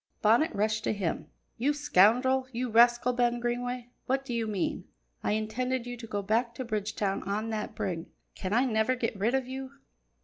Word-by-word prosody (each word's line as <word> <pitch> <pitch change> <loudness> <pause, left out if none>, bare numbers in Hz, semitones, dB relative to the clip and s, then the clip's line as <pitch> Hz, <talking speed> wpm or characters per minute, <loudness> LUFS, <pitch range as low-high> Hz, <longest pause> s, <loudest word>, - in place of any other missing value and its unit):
Bonnet 235 +10 +4
rushed 215 +1 +1
up - - -17
to - - +1
him. 190 -6 -2 0.3
"You 280 +5 +2
scoundrel! 260 0 +4
You 245 0 -3
rascal, 240 +2 +5
Ben 240 0 +1
Greenway, 245 0 -3 0.2
what 270 +1 0
do 250 - -4
you 230 -1 -1
mean? 200 -4 -2 0.4
I - - +1
intended 235 +4 -1
you 245 0 -5
to 230 -1 -9
go 205 -2 -3
back 230 +3 0
to 255 - -4
Bridgetown 210 -3 -1
on 215 +3 -1
that 215 -1 -4
brig. 170 -2 -3 0.3
Can 185 - -5
I 240 +5 +3
never 220 +1 +2
get 235 -3 -2
rid 220 +6 +1
of 265 -2 -1
you?" 265 +1 -6
235 Hz, 195 wpm, -29 LUFS, 215-250 Hz, 0.4 s, rascal